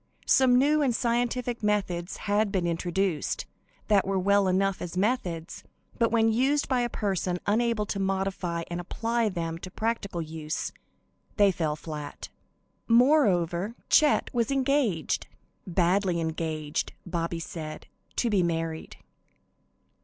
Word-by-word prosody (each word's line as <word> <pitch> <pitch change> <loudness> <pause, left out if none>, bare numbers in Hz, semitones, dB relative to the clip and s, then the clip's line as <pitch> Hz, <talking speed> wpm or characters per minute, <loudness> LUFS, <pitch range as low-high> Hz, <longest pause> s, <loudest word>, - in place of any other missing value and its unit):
Some 255 -2 +5
new 295 +4 +4
and 260 -5 +2
scientific 240 0 0
methods 195 -5 -1
had 205 0 +2
been 185 -3 0
introduced, 175 0 -1 0.4
that 200 -3 +3
were 195 0 +1
well 200 +1 +3
enough 190 +1 +1
as 175 +1 -5
methods, 185 -6 -1 0.4
but 230 -1 +3
when 225 -1 +3
used 275 +5 +2
by 255 -2 +1
a 240 - 0
person 190 -5 -1
unable 225 0 +1
to 200 - -3
modify 190 -3 -1
and 175 +1 -2
apply 230 +5 -1
them 165 -3 -4
to 185 - -8
practical 210 -3 -2
use, 155 -1 -4 0.7
they 205 -2 +5
fell 160 -4 -1
flat. 150 -2 -7 0.6
Moreover, 225 - +3
Chet 300 -1 +4
was 235 -3 +1
engaged 270 - +1 0.4
"badly 180 0 +2
engaged," 160 -2 -2
Bobby 170 -1 -2
said 155 -2 -7 0.3
to 235 - +1
be 200 -3 +3
married. 165 -2 -2
195 Hz, 130 wpm, -27 LUFS, 170-230 Hz, 0.7 s, Some